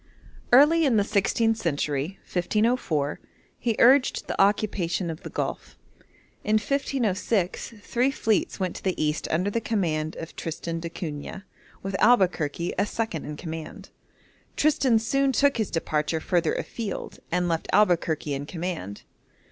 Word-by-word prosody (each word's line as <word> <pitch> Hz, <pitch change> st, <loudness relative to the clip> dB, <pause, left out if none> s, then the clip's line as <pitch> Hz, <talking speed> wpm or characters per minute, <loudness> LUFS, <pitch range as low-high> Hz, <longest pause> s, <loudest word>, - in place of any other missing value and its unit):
Early 300 Hz, +6 st, +7 dB
in 260 Hz, -7 st, +3 dB
the 205 Hz, -, +4 dB
sixteenth 220 Hz, +2 st, +1 dB
century 150 Hz, 0 st, -2 dB
(1504), 180 Hz, -, 0 dB, 0.4 s
he 230 Hz, -2 st, 0 dB
urged 260 Hz, +2 st, +4 dB
the -, -, 0 dB
occupation 195 Hz, -4 st, +1 dB
of 160 Hz, -, -8 dB
the -, -, -7 dB
Gulf. -, -, -4 dB, 0.7 s
In 215 Hz, -, +2 dB
1506 220 Hz, -5 st, 0 dB
three 245 Hz, +3 st, +1 dB
fleets 220 Hz, -7 st, 0 dB
went 185 Hz, -2 st, -2 dB
to -, -, -11 dB
the 190 Hz, -2 st, -1 dB
East 150 Hz, 0 st, 0 dB
under 180 Hz, +6 st, 0 dB
the 230 Hz, -, -1 dB
command 160 Hz, -9 st, -1 dB
of 165 Hz, -, -8 dB
Tristan 165 Hz, +1 st, -4 dB
d'Acunha, 165 Hz, +1 st, -6 dB, 0.4 s
with 195 Hz, 0 st, -3 dB
Albuquerque 180 Hz, -8 st, +2 dB
as 205 Hz, +1 st, +1 dB
second 220 Hz, -9 st, -3 dB
in 150 Hz, 0 st, -6 dB
command. 160 Hz, -1 st, -7 dB, 0.7 s
Tristan 275 Hz, -6 st, +3 dB
soon 275 Hz, +5 st, +1 dB
took 280 Hz, +1 st, +3 dB
his 220 Hz, -3 st, -1 dB
departure 160 Hz, -1 st, -1 dB
further 170 Hz, 0 st, +1 dB
afield, 220 Hz, -5 st, -5 dB
and 180 Hz, +1 st, +1 dB
left 165 Hz, -1 st, -1 dB
Albuquerque 165 Hz, -7 st, +2 dB
in 140 Hz, +1 st, -4 dB
command. 165 Hz, -, -5 dB
190 Hz, 140 wpm, -26 LUFS, 160-225 Hz, 0.7 s, Early